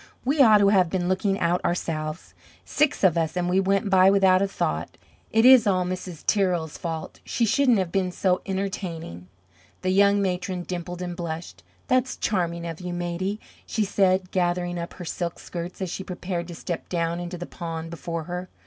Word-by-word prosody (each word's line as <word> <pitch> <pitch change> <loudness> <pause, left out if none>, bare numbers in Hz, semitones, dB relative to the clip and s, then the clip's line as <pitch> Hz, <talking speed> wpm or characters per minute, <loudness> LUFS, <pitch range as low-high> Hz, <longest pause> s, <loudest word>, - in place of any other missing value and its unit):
"We 280 +3 +3
ought 220 -5 +8
to 200 -1 +4
have 185 -4 +4
been 180 -1 -1
looking 195 +1 +1
out 170 +1 +1
ourselves! 155 -2 -3 0.3
Six 300 -7 +1
of 175 -3 +4
us, 165 +2 -1
and 175 0 0
we 180 +2 +2
went 195 +2 +1
by 190 0 +6
without 190 -1 +4
a 200 - +2
thought! 80 - -3 0.3
It 225 +1 +3
is 255 -4 +8
all 185 -2 +2
Mrs. 180 -2 -6
Tirrell's 180 -6 +1
fault! 165 -2 -5
She 235 - 0
shouldn't 245 +1 +3
have 185 -3 -1
been 190 -2 0
so 180 0 +1
entertaining!" 185 - -4 0.6
The 185 - +1
young 200 +1 +4
matron 185 -1 -2
dimpled 175 0 -5
and 175 -1 -4
blushed. 165 - -6 0.3
"That's 255 +1 +1
charming 170 -4 -1
of 165 0 -6
you, 180 -1 -4
Maidie," 175 +4 -3 0.3
she 220 - 0
said, 190 -2 +2
gathering 175 -1 0
up 170 - -6
her 180 - -8
silk 170 0 -3
skirts 175 +2 -6
as 180 - -4
she 190 - -4
prepared 180 -2 -4
to 175 - -8
step 170 +1 -5
down 170 -1 -1
into 175 +1 -5
the 175 - -6
pond 165 -2 -6
before 170 -1 -4
her. 180 +2 -5
180 Hz, 190 wpm, -25 LUFS, 170-195 Hz, 0.6 s, ought